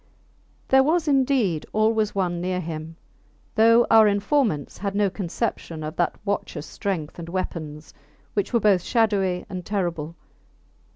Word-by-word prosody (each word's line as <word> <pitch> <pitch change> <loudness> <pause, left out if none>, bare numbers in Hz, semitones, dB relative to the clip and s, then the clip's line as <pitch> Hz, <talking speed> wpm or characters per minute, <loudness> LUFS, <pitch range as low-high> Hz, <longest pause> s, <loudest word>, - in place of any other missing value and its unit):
There 265 0 +6
was 315 +3 +1
indeed 260 - +2
always 215 -1 +1
one 175 -3 -1
near 180 0 -1
him, 160 -1 -6 0.6
though 230 +2 +5
our 220 -1 +7
informants 205 - 0
had 200 0 -3
no 200 -2 +2
conception 175 -4 -4
of 155 +1 -5
that 175 - +1
watchers 185 -6 -3
strength 175 -6 -4
and 170 0 -7
weapons, 155 -4 -5 0.4
which 205 - -1
were 235 - +3
both 200 -4 +3
shadowy 200 -5 +1
and 180 -1 -6
terrible. 170 -5 -3
195 Hz, 135 wpm, -24 LUFS, 170-220 Hz, 0.6 s, our